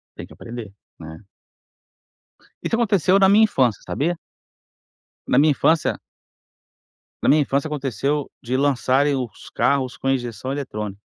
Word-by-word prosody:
Tem - - -8
que - - -17
aprender, 115 -4 -9 0.3
né? 80 +2 -10 1.4
Isso - - -2
aconteceu 200 -5 +3
na 195 -1 +5
minha 210 +3 +6
infância, 130 - +1
sabia? 170 +5 -1 1.1
Na 125 - +2
minha 150 +2 +5
infância 160 +3 +1 1.2
na - - +1
minha 150 - +5
infância 140 +2 -1
aconteceu, 140 0 -2
de 125 +2 -1
lançarem 140 +1 +2
os 125 -6 -5
carros 130 -3 0
com 135 - -2
injeção 120 -2 -3
eletrônica. 105 -8 -5
135 Hz, 130 wpm, -22 LUFS, 120-150 Hz, 1.4 s, minha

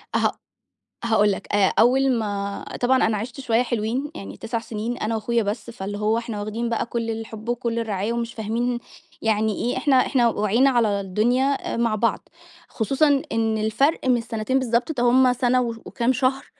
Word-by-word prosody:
هأ - - +3 0.7
هاقول 210 -3 +3
لك، - - -5
آآ، 200 -2 +3
أول 265 +3 +4
ما 200 -4 -2 0.2
طبعًا 260 +1 +3
أنا 220 -1 +1
عِشت 245 +6 -6
شوية 235 -3 +2
حلوين 240 +5 -2
يعني 195 - -8
9 230 0 -3
سنين 230 +1 -4
أنا 225 0 -2
وأخويا 230 +1 0
بس، 210 +3 -4
فاللي 205 -3 -5
هو 215 +2 +1
إحنا 230 -3 -4
واخدين 225 +3 -3
بقى 230 - -1
كل 230 -1 -3
الحب 225 0 -7
وكل 235 -1 -1
الرعاية 215 0 -2
ومش 235 0 -3
فاهمين 235 +3 -2 0.4
يعني 220 -1 +1
إيه، 245 - -1
إحنا 280 -3 +2
إحنا 240 -3 +3
وعينا 220 +6 +2
على 220 -6 +2
الدنيا 245 +8 0
آآ، - - -2
مع 230 -2 +1
بعض، 215 0 -1 0.4
خصوصًا 275 +5 +2
إن 225 -1 +1
الفرق 235 +9 +1
مش 240 -2 +3
سنتين 230 +3 -1
بالضبط، 240 +3 0
ده 245 -5 -1
هم 250 +1 +5
سَنة 250 0 +2
وش 235 -2 -2
وكام 250 0 0
شهر، 265 +1 0
230 Hz, 180 wpm, -23 LUFS, 215-245 Hz, 0.7 s, هم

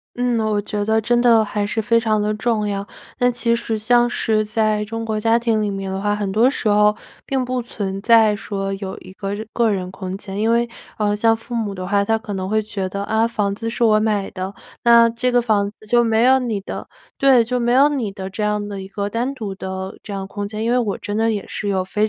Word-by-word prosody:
嗯， 245 -2 0
我 215 -1 +1
觉 205 0 -3
得 220 +1 +2
真 240 +2 +2
的 230 -3 +5
还 205 0 -2
是 215 - -2
非 230 +1 +3
常 220 -2 +1
的 210 +1 0
重 215 -1 0
要。 200 -1 -3 0.3
那 245 -1 +4
其 235 -1 +1
实 225 -1 -2
像 240 +2 +3
是 220 -3 +1
在 215 0 0
中 225 +1 -5
国 220 -1 -1
家 225 +2 +3
庭 230 -2 +1
里 210 - 0
面 195 -1 -4
的 190 0 -3
话， 205 0 +1
很 205 -2 -2
多 230 +6 +4
时 245 - -2
候 210 0 +4 0.3
并 265 -2 0
不 250 0 -2
存 195 -4 -5
在 220 -1 +5
说 195 -2 -4
有 195 -1 -6
一 185 - -13
个 195 0 -4
日 215 +1 -7
个 235 -2 +2
人 185 -2 -3
空 185 0 -6
间， 195 0 -6
因 225 +1 +2
为， 235 +1 +2 0.3
呃， 205 -1 +1
像 225 +1 +3
父 235 +2 -10
母 215 -4 -2
的 185 -1 -5
话， 200 0 +2
他 225 +2 +1
可 220 -2 -7
能 190 0 -3
会 215 0 +2
觉 195 -3 -4
得： 200 +1 -4
“啊， 220 +1 +2
房 205 -3 -1
子 225 +3 -4
是 235 +1 -1
我 215 -1 +5
买 210 -2 0
的， 190 +1 -5 0.3
那 235 -1 +7
这 250 +2 -1
个 245 - +4
房 205 -3 +1
子 215 +1 -19
就 240 +2 +4
没 225 0 +2
有 265 +1 +5
你 230 -5 -2
的 - - -7 0.3
对， 265 -4 +5
就 250 +2 -1
没 240 0 +1
有 275 +3 +6
你 245 -9 -2
的 190 -1 -6
这 215 - -5
样 210 0 -1
的 200 -2 -6
一 190 - -8
个 200 +1 -3
单 245 +5 -2
独 215 -6 -5
的 190 0 -6
这 205 - -10
样 195 -1 -4
空 205 0 -5
间“。 215 +1 -5
因 235 - +1
为 250 - +3
我 210 -5 -1
真 205 - -5
的 225 0 +2
也 205 -2 -3
是 205 - -3
有 190 -2 0
非 210 +3 0
215 Hz, 275 characters per minute, -20 LUFS, 200-230 Hz, 0.3 s, 那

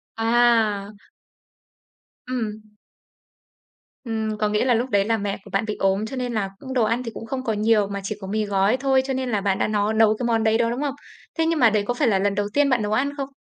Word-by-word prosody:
À. 225 -3 +2 1.4
Ừm. 220 -4 -3 1.4
Ừm, 220 -3 -3
có 210 0 0
nghĩa 210 +3 +1
là 255 - +3
lúc 240 +3 0
đấy 200 -3 +2
là 225 0 +1
mẹ 200 -1 -3
của - - -13
bạn 195 +3 0
bị 215 - -3
ốm, 195 +2 +1
cho 250 - -6
nên 250 -2 -3
là 200 -3 -1
cũng 265 -1 -7
đồ 250 -3 +2
ăn 230 +3 0
thì 230 - -5
cũng - - -8
không 255 +3 -4
có 225 -4 -1
nhiều 210 -1 +2
mà 200 0 -4
chỉ 210 +2 -3
có 190 - -6
mì 215 +1 -1
gói 200 +4 +2
thôi. 265 0 +2
Cho 270 - -2
nên 260 -1 -2
là 210 -4 0
bạn 195 -1 0
đã - - +1
nó 210 0 0
nấu 220 -1 +4
cái 250 - -1
món 225 -2 +1
đấy 220 0 +3
đó, 230 0 +1
đúng 245 +4 -3
không? 285 -2 -2 0.4
Thế 325 - +2
nhưng 325 -1 +1
mà 240 - +6
đấy 210 -1 +1
có 245 - +1
phải 265 +2 +1
là 200 -4 +2
lần 200 0 0
đầu 205 0 -1
tiên 290 -1 +3
bạn 255 -4 +2
nấu 210 0 -2
ăn 265 +6 +1
không? 275 -1 -4
225 Hz, 260 wpm, -23 LUFS, 210-250 Hz, 1.4 s, mà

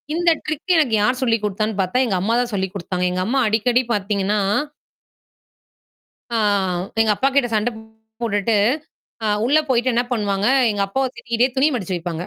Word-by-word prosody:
இந்த 345 0 +3
ட்ரிக்கு 310 +4 -1
எனக்கு 275 -8 +2
யார் 250 +3 +1
சொல்லி 230 -3 +2
குடுத்தான்னு 210 +1 -2
பாத்தா, 185 +6 -1
எங்க 210 -6 -1
அம்மா 220 +4 0
தான் 245 -1 -3
சொல்லி 190 -1 0
குடுத்தாங்க. 180 -1 -3
எங்க 185 0 -2
அம்மா 270 +3 +1
அடிக்கடி 235 +4 +2
பாத்தீங்கன்னா 205 0 0 2.0
ஆ - - +2 0.6
எங்க 220 -1 +3
அப்பா 270 - +2
கிட்ட 275 -4 +3
சண்டப் 220 +1 -1 0.4
போட்டுட்டு. 210 -1 +1 0.7
அ - - +1 0.2
உள்ள 285 +6 +4
போயிட்டு 255 0 +2
என்னா 240 +1 +1
பண்ணுவாங்க? 205 -3 0 0.2
எங்க 205 -1 -1
அப்பாவ 265 +6 0
திட்டிக்கிட்டே 235 +1 0
துணி 275 +3 +4
மடிச்சு 190 -5 -3
வைப்பாங்க. 170 -1 -4
225 Hz, 160 wpm, -20 LUFS, 200-250 Hz, 2.0 s, உள்ள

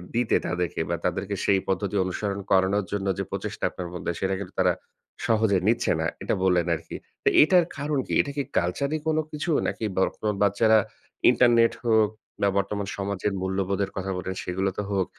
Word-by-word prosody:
দিতে 120 -1 +2
তাদেরকে 90 -1 -2
বা 85 - +1
তাদেরকে 95 +3 -1
সেই 95 -1 +4
পদ্ধতি 100 +1 -1
অনুসরণ 100 +2 -3
করানোর 95 +1 +3
জন্য 100 -1 -2
যে - - 0
প্রচেষ্টা - - -5
আপনার 90 -1 -6
মধ্যে 85 0 -3
সেটা 95 0 0
কিন্তু 100 -2 -7
তারা - - +4 0.5
সহজে 110 -3 +3
নিচ্ছে 115 - +2
না। - - 0 0.2
এটা - - 0
বললেন 90 -2 +3
আরকি। 80 +1 -9 0.3
তো - - -3
এইটার 175 +2 +5
কারণ 145 +1 -1
কি? - - -3
এটা 140 - -5
কি 140 - +1
কালচারি 140 - 0
কোন 160 -1 +2
কিছু? 155 +3 -2 0.2
নাকি - - -4
বা 95 - +3 0.4
বাচ্চারা 110 +2 +4 0.5
ইন্টারনেট 115 -2 +4
হোক, 110 -2 +4 0.3
বা 100 - +4
বর্তমান 100 0 -1
সমাজের 100 0 -2
মূল্যবোধের 95 +1 -1
কথা 95 0 -2
বলেন 95 +1 -4
সেগুলোতে 95 +2 -2
হোক। 95 -2 +1
100 Hz, 175 wpm, -26 LUFS, 95-110 Hz, 0.5 s, এইটার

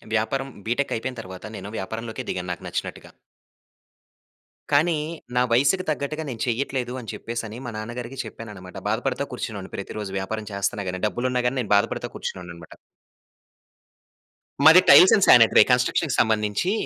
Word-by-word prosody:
వ్యాపారం 135 +5 -1 0.2
బిటెక్ 135 +4 0
అయిపోయిన 125 +1 -5
తర్వాత 95 0 -10
నేను 105 - -8
వ్యాపారంలోకే 110 +4 -5
దిగాను 90 -1 -4
నాకు 90 - -7
నచ్చినట్టుగా. - - -5 1.6
కానీ 155 +3 +3 0.4
నా 125 - +4
వయసుకు 140 +10 +3
తగ్గట్టుగా 155 +1 -2
నేను 115 -3 -6
చెయ్యట్లేదు 125 0 -2
అని 115 -5 -7
చెప్పేసనీ 115 -1 -6
మా 120 - -4
నాన్నగారికి 120 +4 -6
చెప్పానన్నమాట. 100 -5 -10
బాధపడతా - - -1
కూర్చునేవాడిని - - -6
ప్రతిరోజు. 105 -2 -6
వ్యాపారం 105 +3 -5
చేస్తన్న 100 0 -2
గాని 90 0 -5
డబ్బులు 120 +4 -2
ఉన్న 125 - +1
గాని 130 +2 -2
నేను 105 -3 -6
బాధపడతా 100 - -1
కూర్చునేవాడినన్నమాట. 85 -2 -7 1.9
మాది 165 +4 +9
టైల్స్ 185 - +9
అండ్ 200 - +3
సానిటరీ 115 -2 +7
కన్స్ట్రక్షన్‌కి 125 +4 +2
సంబంధించి 110 - +1
115 Hz, 135 wpm, -24 LUFS, 105-135 Hz, 1.9 s, మాది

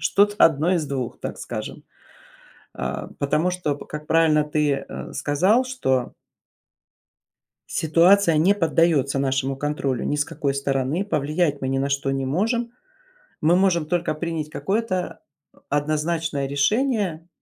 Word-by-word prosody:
что-то 205 +1 +3
одно 160 +3 +4
из 160 -4 -1
двух, 130 -4 -4
так - - -5
скажем, - - -6 0.9
э, - - -4
потому 150 +5 +1
что, 175 -6 -2
как 150 +1 -8
правильно 160 -2 +3
ты 150 -2 0 0.3
сказал, 180 - +2
что 130 - -1 1.5
ситуация 170 +2 +4
не 180 +6 +4
поддается 160 -6 +2
нашему 135 0 0
контролю 140 -3 -2
ни - - 0
с 145 0 0
какой 140 -1 -2
стороны, 140 +6 -1
повлиять 150 -3 0
мы 130 - -2
ни 135 - 0
на 135 +1 0
что 140 -1 -1
не 135 0 -2
можем. 230 - 0 0.7
Мы 165 +3 +4
можем 180 -4 +2
только 175 -2 0
принять 155 -1 -4
какое-то 185 -4 -2 0.5
однозначное 155 0 -1
решение 185 - 0
155 Hz, 125 wpm, -23 LUFS, 140-180 Hz, 1.5 s, одно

